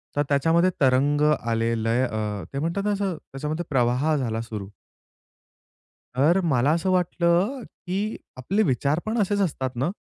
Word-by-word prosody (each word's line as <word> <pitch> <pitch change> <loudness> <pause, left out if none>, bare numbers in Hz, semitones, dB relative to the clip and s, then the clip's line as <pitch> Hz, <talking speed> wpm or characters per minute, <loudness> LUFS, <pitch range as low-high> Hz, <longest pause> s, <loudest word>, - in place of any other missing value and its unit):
तर 145 - +2
त्याच्यामध्ये 165 +5 +3
तरंग 140 +2 +3
आले, 115 -4 0
लय 115 +3 +2
अ, 105 -4 -3
ते 135 - -2
म्हणतात 170 +6 -1
ना 210 - +1
असं 195 -3 -1 0.2
त्याच्यामध्ये 150 +5 -4
प्रवाह 130 +4 +2
झाला 115 -5 -2
सुरू. 110 -4 -6 1.5
तर 155 +8 +4
मला 140 -3 +2
असं 170 +3 0
वाटलं, 180 +7 +1
की 195 +4 -4 0.2
आपले 195 - 0
विचार 140 - +1
पण 220 +2 -1
असेच 205 +1 0
असतात 130 -8 -2
ना, 135 +7 0
145 Hz, 150 wpm, -24 LUFS, 125-180 Hz, 1.5 s, तर